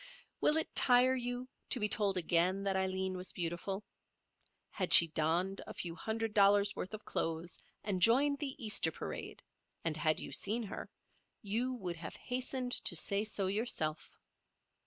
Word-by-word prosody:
Will 300 Hz, -, +2 dB
it 320 Hz, -, 0 dB
tire 250 Hz, +1 st, +4 dB
you 245 Hz, 0 st, -4 dB, 0.2 s
to 250 Hz, -, +3 dB
be 210 Hz, -, +1 dB
told 205 Hz, -2 st, 0 dB
again 180 Hz, +3 st, +2 dB
that 195 Hz, -1 st, -1 dB
Aileen 190 Hz, 0 st, -2 dB
was 180 Hz, 0 st, -2 dB
beautiful? 180 Hz, +3 st, -4 dB, 0.9 s
Had -, -, 0 dB
she 170 Hz, -, +11 dB
donned 170 Hz, +5 st, -1 dB
a -, -, -9 dB
few 170 Hz, -2 st, -5 dB
hundred 220 Hz, +5 st, -4 dB
dollars' 200 Hz, -1 st, +4 dB
worth 190 Hz, +4 st, -6 dB
of 215 Hz, -, -13 dB
clothes 165 Hz, +2 st, -3 dB, 0.2 s
and 195 Hz, -3 st, -2 dB
joined 280 Hz, +7 st, +4 dB
the 275 Hz, -3 st, -5 dB
Easter 210 Hz, -8 st, +1 dB
parade, -, -, -7 dB, 0.4 s
and 160 Hz, -2 st, 0 dB
had 155 Hz, 0 st, +2 dB
you -, -, -6 dB
seen 225 Hz, +4 st, 0 dB
her, 205 Hz, -, -8 dB, 0.5 s
you 235 Hz, +5 st, -1 dB
would 180 Hz, -7 st, -5 dB
have 160 Hz, -1 st, -8 dB
hastened 250 Hz, 0 st, -4 dB
to 175 Hz, -, +1 dB
say 200 Hz, +5 st, +4 dB
so 210 Hz, -2 st, -1 dB
yourself. 190 Hz, -6 st, -3 dB
200 Hz, 160 wpm, -33 LUFS, 180-240 Hz, 0.9 s, she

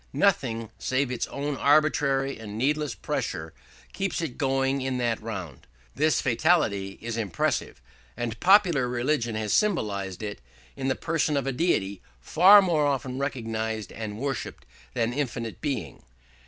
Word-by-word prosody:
Nothing 115 Hz, -, +1 dB
save 130 Hz, 0 st, 0 dB
its 125 Hz, -, -2 dB
own 145 Hz, +1 st, -3 dB
arbitrary 140 Hz, -2 st, +2 dB
and 105 Hz, -1 st, -7 dB
needless 145 Hz, +2 st, 0 dB
pressure 80 Hz, 0 st, -3 dB, 0.4 s
keeps 195 Hz, -1 st, -2 dB
it 160 Hz, -7 st, -3 dB
going 135 Hz, -1 st, 0 dB
in 130 Hz, -1 st, -1 dB
that 120 Hz, -2 st, -1 dB
round. 95 Hz, -, -7 dB, 0.3 s
This 155 Hz, +2 st, +2 dB
fatality 115 Hz, -, +1 dB
is 115 Hz, 0 st, -4 dB
impressive, 105 Hz, -7 st, -1 dB, 0.4 s
and 115 Hz, -2 st, -3 dB
popular 180 Hz, -9 st, +5 dB
religion 120 Hz, -1 st, 0 dB
has 110 Hz, -1 st, -1 dB
symbolised 105 Hz, -, 0 dB
it 105 Hz, -9 st, -5 dB, 0.3 s
in 135 Hz, -1 st, -3 dB
the 130 Hz, -, +1 dB
person 155 Hz, +4 st, 0 dB
of 140 Hz, -, -1 dB
a 135 Hz, -, 0 dB
deity 110 Hz, -, 0 dB, 0.2 s
far 190 Hz, -, +7 dB
more 160 Hz, -5 st, +2 dB
often 130 Hz, -2 st, -2 dB
recognised 110 Hz, -6 st, -3 dB
and 105 Hz, -2 st, -6 dB
worshipped 135 Hz, +3 st, -4 dB, 0.3 s
than 120 Hz, -1 st, 0 dB
infinite 115 Hz, -5 st, -3 dB
Being. 125 Hz, -, -3 dB
130 Hz, 140 wpm, -26 LUFS, 110-145 Hz, 0.4 s, far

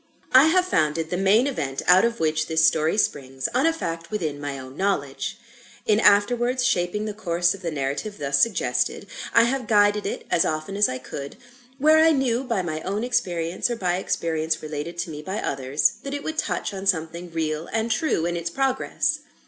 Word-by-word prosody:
I 260 Hz, +3 st, +8 dB
have 360 Hz, +3 st, +3 dB
founded 160 Hz, -, 0 dB
the -, -, 0 dB
main 195 Hz, +6 st, +3 dB
event 145 Hz, -, -3 dB
out 180 Hz, +2 st, +6 dB
of 235 Hz, 0 st, 0 dB
which 155 Hz, -1 st, 0 dB
this 160 Hz, 0 st, +3 dB
story 160 Hz, +5 st, +2 dB
springs, 135 Hz, -9 st, -1 dB
on 260 Hz, +6 st, +3 dB
a -, -, +4 dB
fact 170 Hz, -, -5 dB
within 155 Hz, -9 st, -3 dB
my 145 Hz, -1 st, -4 dB
own 130 Hz, 0 st, -10 dB
knowledge. 195 Hz, +1 st, -2 dB, 0.5 s
In 215 Hz, 0 st, +3 dB
afterwards 240 Hz, +5 st, +3 dB
shaping 185 Hz, 0 st, 0 dB
the 210 Hz, -, -4 dB
course 175 Hz, -4 st, 0 dB
of 195 Hz, -, -11 dB
the 170 Hz, -, -2 dB
narrative 150 Hz, +8 st, -3 dB
thus 140 Hz, -1 st, +1 dB
suggested, 155 Hz, -, 0 dB, 0.3 s
I 230 Hz, -, +6 dB
have 255 Hz, +2 st, -1 dB
guided 205 Hz, -2 st, +3 dB
it, -, -, -5 dB
as 170 Hz, -, +4 dB
often 155 Hz, +5 st, -3 dB
as 205 Hz, +1 st, +4 dB
I 130 Hz, -, -3 dB
could, 140 Hz, +2 st, -8 dB, 0.4 s
where 310 Hz, +3 st, +5 dB
I 325 Hz, 0 st, +5 dB
knew 260 Hz, -3 st, 0 dB
by 230 Hz, -8 st, -1 dB
my 155 Hz, -2 st, -4 dB
own 200 Hz, +5 st, -3 dB
experience, 185 Hz, -8 st, -1 dB
or 240 Hz, -, -1 dB
by 180 Hz, -5 st, -1 dB
experience 160 Hz, -4 st, -2 dB
related 155 Hz, +3 st, -5 dB
to 170 Hz, -, -3 dB
me 150 Hz, -1 st, -7 dB
by 190 Hz, +6 st, -4 dB
others, 135 Hz, +2 st, 0 dB
that 280 Hz, 0 st, -5 dB
it 285 Hz, -, -5 dB
would 315 Hz, 0 st, -3 dB
touch -, -, -2 dB
on 195 Hz, 0 st, -5 dB
something 170 Hz, -1 st, -1 dB
real 160 Hz, 0 st, -2 dB
and 225 Hz, +1 st, -1 dB
true 230 Hz, -, 0 dB
in 175 Hz, 0 st, -1 dB
its 170 Hz, 0 st, -3 dB
progress. 265 Hz, +7 st, 0 dB
180 Hz, 200 wpm, -24 LUFS, 155-230 Hz, 0.5 s, I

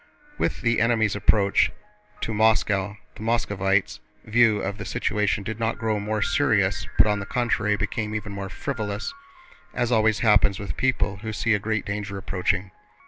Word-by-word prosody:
With -, -, -1 dB
the 115 Hz, -1 st, +2 dB
enemy's 110 Hz, -3 st, +2 dB
approach 100 Hz, 0 st, +3 dB, 0.5 s
to 110 Hz, -, -2 dB
Moscow, 105 Hz, -2 st, +2 dB, 0.2 s
the -, -, -13 dB
Moscovites' 100 Hz, -4 st, 0 dB, 0.3 s
view 110 Hz, -1 st, +4 dB
of 100 Hz, +1 st, -4 dB
their -, -, -4 dB
situation 105 Hz, 0 st, 0 dB
did 110 Hz, +2 st, -5 dB
not 115 Hz, 0 st, -1 dB
grow 110 Hz, -2 st, -1 dB
more 105 Hz, 0 st, -1 dB
serious 100 Hz, -1 st, +1 dB
but -, -, +7 dB
on 105 Hz, -1 st, +1 dB
the 100 Hz, -, -5 dB
contrary 105 Hz, -4 st, +1 dB
became 105 Hz, +1 st, -3 dB
even 105 Hz, -1 st, -4 dB
more 100 Hz, -1 st, -5 dB
frivolous, 110 Hz, -, -4 dB, 0.6 s
as 120 Hz, 0 st, 0 dB
always 110 Hz, -2 st, +3 dB
happens 105 Hz, -3 st, +4 dB
with 100 Hz, -, -5 dB
people 125 Hz, -6 st, 0 dB
who 110 Hz, +2 st, -5 dB
see 110 Hz, +2 st, +1 dB
a 105 Hz, -, +2 dB
great 105 Hz, 0 st, -2 dB
danger 100 Hz, 0 st, -4 dB
approaching. 95 Hz, 0 st, -1 dB
105 Hz, 165 wpm, -24 LUFS, 100-110 Hz, 0.6 s, but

